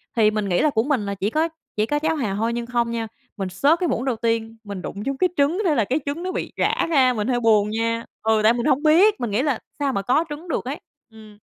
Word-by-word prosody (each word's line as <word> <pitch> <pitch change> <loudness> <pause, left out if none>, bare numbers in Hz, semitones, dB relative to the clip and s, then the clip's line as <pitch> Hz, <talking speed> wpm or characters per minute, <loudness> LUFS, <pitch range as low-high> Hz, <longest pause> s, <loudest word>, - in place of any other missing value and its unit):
Thì 215 -2 +4
mình 210 -2 -2
nghĩ 175 - +2
là 305 - +3
của 225 -5 +1
mình 265 -6 0
là 200 0 -3
chỉ 195 +3 -1
có 315 +5 0 0.3
chỉ 215 0 +1
có 295 +4 0
cháo 320 +1 0
hàu 215 -9 -2
hôi 225 +3 -1
nhưng 235 0 -3
không 235 -1 -1
nha, 230 -1 -3 0.3
mình 190 -2 -3
xớt 285 - +2
cái 355 - 0
muỗng 245 - -1
đầu 260 -4 0
tiên, 225 0 -2
mình 200 -3 -6
đụng 200 +3 -6
trúng 275 -1 -2
cái 365 +3 +2
trứng, 295 +7 +2
thế 315 - +3
là 225 -6 +2
cái 270 +8 0
trứng 290 +5 -3
nó 370 - -2
bị - - -4
rã - - +1
ra, 260 -6 +4
mình 215 0 -2
hơi 245 -2 +1
buồn 215 -3 +3
nha. 230 +1 -1 0.2
Ừ, 220 0 +3
tại 225 +2 +6
mình 240 -1 -2
hông 290 0 +2
biết, 355 +7 +5
mình 240 -4 -2
nghĩ 220 +6 +1
là 280 -5 0 0.2
sao 275 -2 0
mà 200 - -1
có 260 - +2
trứng 295 +4 -7
được 320 - -2
ấy, 275 +4 -4 0.3
ừm. 215 -2 -15
235 Hz, 285 wpm, -22 LUFS, 215-290 Hz, 0.3 s, tại